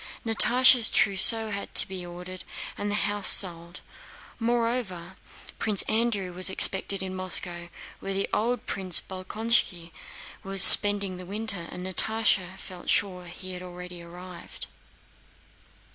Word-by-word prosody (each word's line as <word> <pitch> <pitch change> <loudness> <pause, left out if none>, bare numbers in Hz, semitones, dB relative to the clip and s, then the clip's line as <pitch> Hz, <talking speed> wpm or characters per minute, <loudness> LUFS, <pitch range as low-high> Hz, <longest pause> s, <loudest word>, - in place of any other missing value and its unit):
Natásha's 240 +1 +4
trousseau 215 +2 +4
had 200 0 -7
to - - +6
be 190 -2 -8
ordered 180 +1 -10 0.3
and 205 - -5
the 205 - -1
house 205 0 -3
sold. 170 -2 +1 0.6
Moreover, 230 -6 -3 0.4
Prince 210 -3 -1
Andrew 215 -5 -2
was 185 +2 +2
expected 190 +1 +1
in 185 0 -7
Moscow, 175 -2 0 0.3
where 195 0 -4
old 240 +2 -2
Prince 185 -3 0
Bolkónski 185 -2 -3 0.5
was 195 -1 +3
spending 200 -2 +6
the 180 - -11
winter, 200 -4 -1
and 180 0 -9
Natásha 190 -1 -1
felt 180 -2 -11
sure 180 -3 -1
he 185 +2 -10
had 180 - -9
already 180 -1 -11
arrived. 175 +1 -7
190 Hz, 125 wpm, -25 LUFS, 180-215 Hz, 0.6 s, to